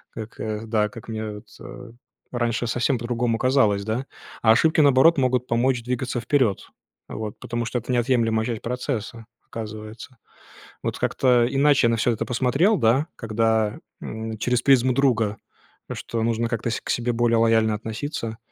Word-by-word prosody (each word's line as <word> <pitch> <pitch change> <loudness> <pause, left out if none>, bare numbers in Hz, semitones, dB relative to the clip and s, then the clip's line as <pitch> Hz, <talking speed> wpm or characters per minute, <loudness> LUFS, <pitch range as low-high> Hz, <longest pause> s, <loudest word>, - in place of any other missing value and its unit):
Как, 110 0 -6
да, 105 -2 +1
как 115 -1 -12
мне 110 -1 -4
вот, 105 +1 -11
э, 125 -1 -10 0.4
раньше 120 -1 -1
совсем 120 +1 0
по-другому 120 -1 -1
казалось, 125 -7 +2
да. 115 +5 -2 0.4
А 110 - +6
ошибки, 160 +8 +3
наоборот, 145 +3 +5
могут 125 -1 +1
помочь 120 +1 +1
двигаться 125 0 -2
вперед, 120 -4 0 0.4
вот, 110 -2 -6
потому 120 0 -3
что 120 +2 -2
это 120 - -6
неотъемлемая 115 -3 +1
часть 115 -3 -3
процесса, 115 -2 -4 0.2
оказывается. 110 +3 -8 0.7
Вот - - -3
как-то 125 -2 +2
иначе 140 -2 +3
я - - +2
на 115 - +1
всё 120 - +2
это 110 - -2
посмотрел, 135 - +2
да, 130 +6 +3
когда, 110 -1 0 0.2
м, 110 0 -6
через 125 +2 0
призму 130 -2 +4
друга, 115 -6 +1 0.6
что 115 -1 -4
нужно 115 0 0
как-то 115 0 -2
с - - -2
к - - -11
себе 120 0 0
более 115 0 +2
лояльно 115 -1 +3
относиться, 110 +1 -5
115 Hz, 160 wpm, -23 LUFS, 110-125 Hz, 0.7 s, А